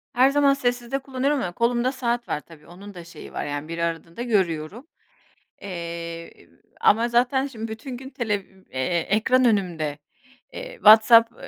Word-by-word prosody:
Her 255 +2 +5
zaman 280 0 +4
sessizde 245 -1 -2
kullanıyorum. 270 +2 -1
Ama 180 - -3
kolumda 240 +5 +1
saat 240 -2 -2
var, - - -1
tabii 155 -2 -17
onun 195 +4 -12
da 175 -2 -10
şeyi 170 -2 -12
var. - - -3
Yani 145 +1 -4
bir 165 +1 -6
aradığında 170 +3 -4
görüyorum. 195 - -1 0.7
Eee, 170 -2 -7 0.3
ama 230 +3 +4
zaten 250 +3 +2
şimdi 225 -4 -7
bütün 255 +3 -8
televi 210 -7 -2 0.3
eee, 130 +7 -1
gün 195 - 0
ekran 255 +3 +3
önümde, 175 -10 0 0.6
eee, - - -8
WhatsApp 230 - +7
220 Hz, 150 wpm, -24 LUFS, 170-250 Hz, 0.7 s, WhatsApp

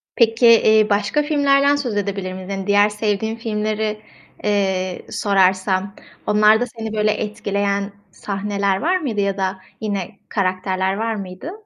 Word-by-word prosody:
Peki, 230 0 +3 0.2
iii, 215 -1 +4
başka 205 +8 +1
filmlerden 285 -1 +3
söz 250 -7 -3
edebilir 195 -2 -3
miyiz? 185 0 -8
Hani, 195 0 -4
diğer 205 +1 +4
sevdiğin 210 +1 -2
filmleri, 215 -1 -2 0.4
eee, 190 -3 -1
sorarsam, 190 0 +1 0.3
onlarda 215 +3 +4
seni 225 -2 -7
böyle 215 0 +2
etkileyen 200 -1 -2 0.2
sahneler 200 0 -2
var 355 +6 +2
mıydı 240 - -2
ya 200 0 -1
da 190 0 -2 0.2
yine 200 -2 -4
karakterler 190 -1 -1
var 225 0 -1
mıydı? 190 - -7
205 Hz, 135 wpm, -20 LUFS, 195-220 Hz, 0.4 s, iii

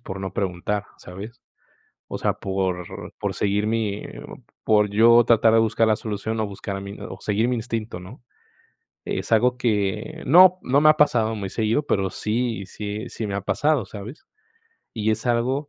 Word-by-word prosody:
por 95 -4 -7
no 95 -2 -5
preguntar, 100 +2 -2
¿sabes?, 105 +7 -10 0.7
o - - -3
sea, - - +1
por 95 -2 -2 0.4
por - - -2
seguir 105 +1 0
mi 110 -2 -1 0.6
por 105 -1 +3
yo 115 +3 +6
tratar 115 -1 +4
de 115 - +6
buscar 115 0 +2
la 110 - +4
solución 110 +1 -4
o 110 - 0
buscar 100 0 -6
a 95 - -5
mi 100 +1 -8
o 95 - -8
seguir 105 +3 0
mi 125 - +1
instinto, 115 -5 -4
¿no?, 105 +8 -12 0.8
es - - -4
algo 125 +3 +4
que 105 -6 -1
no 185 +4 +7
no 135 +3 +2
me 155 - +6
ha 155 - +6
pasado 115 -7 +2
muy 100 -2 -4
seguido, 110 +7 0
pero 95 -2 0
sí 115 -1 -2
sí 105 +2 -6
sí 110 - -5
me 100 - -3
ha 100 - -1
pasado, 145 0 +1
¿sabes?, 110 +8 -10 0.7
y 110 -1 0
es 110 +2 -2
algo 130 +5 0
110 Hz, 180 wpm, -23 LUFS, 100-120 Hz, 0.8 s, no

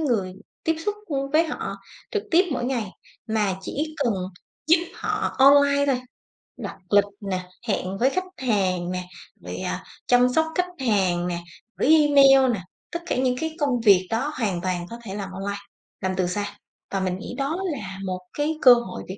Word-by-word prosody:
người 215 -11 0 0.3
tiếp 325 0 +1
xúc, 415 - +1
ưm, 275 -3 -2
với 325 +2 +4
họ 300 - -4 0.3
trực 425 -3 -1
tiếp 360 +3 +5
mỗi 245 - -2
ngày, 235 -7 -2 0.4
mà 210 -4 0
chỉ 310 +10 -4
cần 230 -4 +2 0.5
giúp 330 +3 +7 0.2
họ 430 0 -2
online 280 +1 +6
thôi, 260 -3 +1 0.6
đặt - - -6
lịch 205 0 +6 0.2
nè, 185 -2 -4 0.2
hẹn 195 -2 -1
với 260 +5 +3
khách 370 +5 -1
hàng 185 -8 0
nè, 180 0 -3 0.4
rồi, - - -6
à, - - -3 0.2
chăm 250 0 +5
sóc 320 +5 +2
khách 360 0 +1 0.2
hàng 180 -4 +2
nè, 175 -1 -2 0.4
gửi 285 - +1
email 275 -4 +6
nè, 190 - -3 0.3
tất 340 - -3
cả - - -1
những 255 -1 +2
cái 320 0 -3
công 260 -5 +1
việc 190 -4 +5
đó 270 +7 -1
hoàn 190 -6 0
toàn 180 -1 -2
có 235 +1 -8
thể 190 - -6
làm 195 -2 -5
online, 200 +2 -4 0.4
làm 190 0 -1
từ 180 -1 +1
xa. 205 +3 -3 0.3
Và 195 - 0
mình 185 -1 -1
nghĩ - - -7
đó 280 +5 -1
là 200 -8 -6
một 185 0 -3 0.2
cái 305 +2 0
cơ 250 -2 +10
hội 235 -6 -3
việc 190 +2 -7
235 Hz, 190 wpm, -24 LUFS, 190-285 Hz, 0.6 s, cơ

